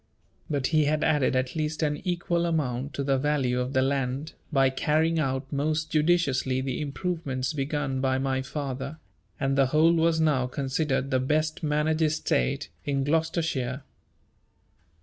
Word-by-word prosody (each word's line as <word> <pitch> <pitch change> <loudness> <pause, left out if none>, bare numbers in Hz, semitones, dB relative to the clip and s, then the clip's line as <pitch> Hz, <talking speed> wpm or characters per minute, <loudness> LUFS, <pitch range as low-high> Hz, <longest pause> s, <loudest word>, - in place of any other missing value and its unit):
But 140 -3 0
he 155 -1 +4
had 155 +1 +1
added 145 -4 +2
at 130 +2 -1
least 155 0 -2
an 150 -1 +1
equal 175 -1 0
amount 140 -4 -1
to 140 - -2
the 135 -1 +1
value 135 -3 +1
of 125 +2 -2
the 130 -1 +3
land, 135 +2 -1 0.2
by 135 -3 +3
carrying 155 +4 +1
out 135 -1 -2
most 155 +2 -1
judiciously 150 -5 +2
the 130 +1 -2
improvements 140 -3 -2
begun 135 -2 -2
by 130 -1 +1
my 130 0 0
father; 135 +1 -5 0.4
and 135 -1 +1
the 135 -1 +4
whole 155 +5 +4
was 165 -1 +2
now 145 -5 +2
considered 135 0 -1
the 130 - +3
best 155 +4 0
managed 155 +1 +1
estate 150 - 0
in 140 -1 0
Gloucestershire. 150 -4 -1
145 Hz, 150 wpm, -27 LUFS, 130-155 Hz, 0.4 s, he